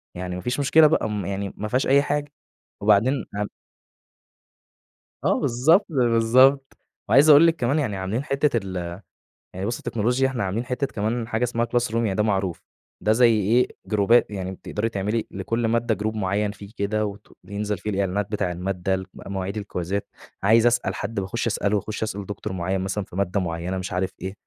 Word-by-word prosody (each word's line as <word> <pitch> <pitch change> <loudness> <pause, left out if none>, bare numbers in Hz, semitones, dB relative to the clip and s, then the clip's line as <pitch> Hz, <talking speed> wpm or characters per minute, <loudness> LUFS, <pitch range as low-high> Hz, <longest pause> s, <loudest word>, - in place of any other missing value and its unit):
يعني 90 0 -4
ما 90 - -5
فيش 125 +7 -2
مشكلة 155 +3 +6
بقى، 130 -7 +1
م 105 -3 -3
يعني 100 0 -3
ما 105 - -3
فيهاش 125 +5 0
أي 140 +1 +5
حاجة، 145 0 -2 0.5
وبعدين 110 +5 +3
ام 105 - -1 1.8
آه، - - +2
بالضبط 150 - +3
بالضبط، 130 0 +3 0.3
وعايز 145 +3 +6
أقول 150 +3 +9
لِك 165 - +2
كمان 135 +1 +1
يعني 115 -10 -1
عاملين 100 +8 -2
حتّة 140 -2 +1
ال 90 -2 -5 0.6
يعني 95 +2 -4
بُصي 120 +3 -2
التكنولوجيا، 125 +4 0
إحنا 130 -5 -2
عاملين 100 +6 -2
حتّه 125 +3 -1
كمان 115 +1 -2
حاجة 115 0 -1
إسمها 120 -1 0
Classroom 120 -2 -1
يعني 110 -5 +1
ده 105 - +2
معروف، 95 -5 -1 0.4
ده 105 - +3
زي 120 +1 +5
إيه 115 +6 +3 0.2
جروبات 105 +3 +3
يعني 95 -2 -4
بتقدري 105 +4 -3
تعملي 105 +2 -2
لكل 115 +5 -2
مادة 115 0 +1
Group 110 0 -1
مُعيّن 100 +1 0
فيه 100 0 -12
كده، 105 +2 0
وت 100 0 -7 0.2
بينزل 105 0 -3
فيه 105 - -5
الإعلانات 100 0 -1
بتاع 100 -4 -1
المادة، 90 +1 -2
الك 95 0 -6
مواعيد 100 +1 -5
الكويزات 100 -1 -3 0.4
عايز 110 +3 +5
أسأل 120 0 +1
حد 105 +1 -3
باخُش 100 +5 -2
أسأله، 105 -1 0
وأخُشّ 110 +2 -4
أسأل 100 -2 -4
دكتور 105 0 -5
مُعيّن 95 +1 -1
مثلًا 95 +2 -2
في 90 - -14
مادة 100 +1 0
مُعيّنة 85 +1 -3
مش 95 +1 -5
عارف 95 +1 -1
إيه، 95 +1 -4
105 Hz, 185 wpm, -24 LUFS, 95-120 Hz, 1.8 s, أقول